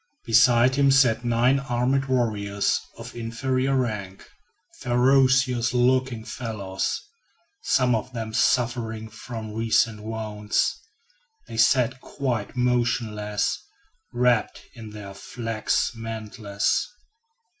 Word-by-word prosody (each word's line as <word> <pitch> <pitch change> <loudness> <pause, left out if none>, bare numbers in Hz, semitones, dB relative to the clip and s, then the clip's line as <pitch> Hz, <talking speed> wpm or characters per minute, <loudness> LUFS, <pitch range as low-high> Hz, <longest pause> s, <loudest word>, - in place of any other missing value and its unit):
Beside 120 +1 +5
him 140 -1 +4
sat 125 -4 +4
nine 120 +3 +2
armed 135 +1 0
warriors 105 -6 0 0.2
of - - -10
inferior 130 +3 -1
rank, 105 -7 -3 0.5
ferocious 130 -1 +3
looking 125 -2 +1
fellows, 100 -6 -3 0.6
some 125 -2 +2
of 115 +3 -2
them 110 -3 -5
suffering 115 -2 0
from 110 -1 -8
recent 115 -1 +1
wounds. 105 -1 -1 0.7
They 115 - -8
sat 125 +2 +3
quite 125 -7 -3
motionless, 115 -4 0 0.5
wrapped 120 -2 +1
in 115 -3 -10
their 105 -2 -9
flax 115 +2 -2
mantles. 110 -3 -2
115 Hz, 95 wpm, -24 LUFS, 110-125 Hz, 0.7 s, Beside